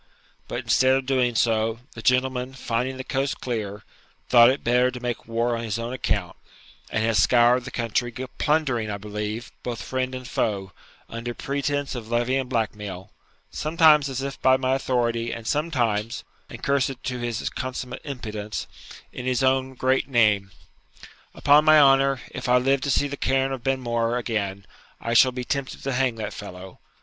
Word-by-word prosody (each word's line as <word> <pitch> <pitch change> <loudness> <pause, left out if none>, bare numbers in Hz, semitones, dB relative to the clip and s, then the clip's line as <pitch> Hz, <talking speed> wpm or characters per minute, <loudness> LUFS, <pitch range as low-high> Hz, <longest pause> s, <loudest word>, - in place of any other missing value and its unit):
But, - - -3
instead 130 +1 +3
of 135 -1 -1
doing 130 -3 +1
so, 115 0 +1
the 115 - -9
gentleman, 130 +1 +1
finding 125 +1 -2
the 130 - -5
coast 135 +1 -2
clear, 105 -5 -4 0.5
thought 120 -1 +8
it 135 - -1
better 125 +2 +3
to 125 -1 -7
make 120 -2 -4
war 115 +1 0
on 115 - -4
his 110 -1 -2
own 115 +2 -4
account, 130 - -2 0.5
and 110 - -1
has 110 -2 +2
scoured 120 +1 +4
the - - -5
country, 120 0 -1 0.3
plundering, 140 -8 +1
I 100 - -3
believe, 105 +2 -5
both 120 -2 -5
friend 130 0 -2
and 130 -1 -7
foe, 95 -5 -1 0.4
under 115 +1 -5
pretence 140 0 -2
of 115 -3 -7
levying 125 +3 0
blackmail, 105 -5 -3 0.4
sometimes 155 -2 +4
as 135 0 -3
if 140 0 -5
by 130 0 +5
my 130 0 0
authority, 120 -3 0
and 115 -1 -6
sometimes 120 -8 -1 0.3
(and - - -8
be - - -22
cursed 135 -2 0
to 125 -1 -3
his 120 -1 -3
consummate 125 -1 -5
impudence) 110 -6 -5 0.5
in 125 - -5
his 130 0 +1
own 130 0 +1
great 130 +1 +1
name! 105 -6 +3 0.9
Upon 145 +1 +5
my 155 0 +7
honour, 135 -2 +4
if 125 0 -5
I 125 - +6
live 135 +2 +2
to 140 - -2
see 145 +1 +2
the 140 0 -6
cairn 135 0 +1
of 135 -2 -4
Benmore 120 -3 0
again, 100 -5 -3 0.3
I 115 - -3
shall 130 +2 +6
be 125 0 -5
tempted 140 +1 -3
to 135 - -2
hang 130 -2 +1
that 110 -2 -5
fellow! 90 +1 -9
125 Hz, 175 wpm, -24 LUFS, 115-135 Hz, 0.9 s, thought